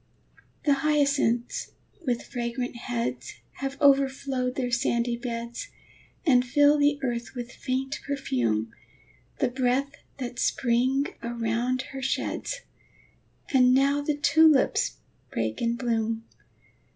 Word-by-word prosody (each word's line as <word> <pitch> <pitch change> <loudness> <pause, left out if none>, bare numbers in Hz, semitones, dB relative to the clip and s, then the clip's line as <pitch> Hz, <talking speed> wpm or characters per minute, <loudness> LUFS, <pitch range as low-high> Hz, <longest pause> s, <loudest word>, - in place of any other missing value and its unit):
The 290 - +5
hyacinths, 280 -6 +1 0.3
with 240 -2 0
fragrant 245 0 -4
heads, 125 - -3 0.2
Have 275 0 -4
overflowed 270 -2 +2
their 250 -2 -1
sandy 235 -1 +1
beds, 235 -1 -5 0.6
And 250 -6 +5
fill 290 +3 +4
the 290 0 +3
earth 240 0 -3
with 240 -1 -5
faint 265 +3 -3
perfume, 120 - -1 0.7
The - - +1
breath 260 +2 0 0.3
that 245 -2 -5
Spring 260 +3 +2 0.2
around 235 +2 -1
her 270 - -5
sheds. - - -2 0.9
And 255 -1 +6
now 280 +2 +3
the 290 0 -1
tulips 310 -1 +4 0.3
break 110 -1 -2
in 235 0 +1
bloom! 225 -2 -1
250 Hz, 110 wpm, -27 LUFS, 235-275 Hz, 0.9 s, And